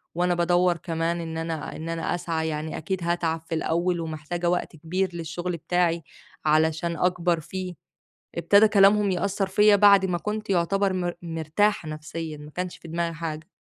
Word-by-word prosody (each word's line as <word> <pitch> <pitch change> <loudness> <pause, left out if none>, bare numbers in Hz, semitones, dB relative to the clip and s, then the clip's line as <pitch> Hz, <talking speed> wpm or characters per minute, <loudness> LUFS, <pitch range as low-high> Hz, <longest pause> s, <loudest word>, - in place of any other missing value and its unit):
وأنا 180 +1 +2
بادوّر 175 0 +3
كمان 165 0 -2
إن 160 -1 -5
أنا 165 -2 -4
إن 160 +1 -6
أنا 165 +1 -1
أسعى 165 -2 -2
يعني 155 +1 -4
أكيد 190 +1 -3
هاتعب 170 -1 0
في 165 - -1
الأول 170 +2 0
ومحتاجة 165 +2 -3
وقت 180 -1 -1
كبير 180 +5 -1
للشغل 170 +1 -4
بتاعي 170 0 0 0.4
علشان 160 +2 +2
أكبر 180 0 +1
فيه، 180 +3 -5 0.6
ابتدى 205 +2 +5
كلامهم 205 0 +5
يأثّر 195 +2 0
فيّا 210 +2 +5
بعد 200 -1 +6
ما 180 -2 0
كنت 210 +3 -4
يعتبر 195 +2 +2
مر 175 -1 -1
مرتاحة 165 +2 0
نفْسيًا، 155 0 -6
ما 150 +1 -11
كانش 180 +2 -4
في 165 - -13
دماغي 170 +1 -2
حاجة. 155 -1 -5
170 Hz, 165 wpm, -25 LUFS, 160-185 Hz, 0.6 s, بعد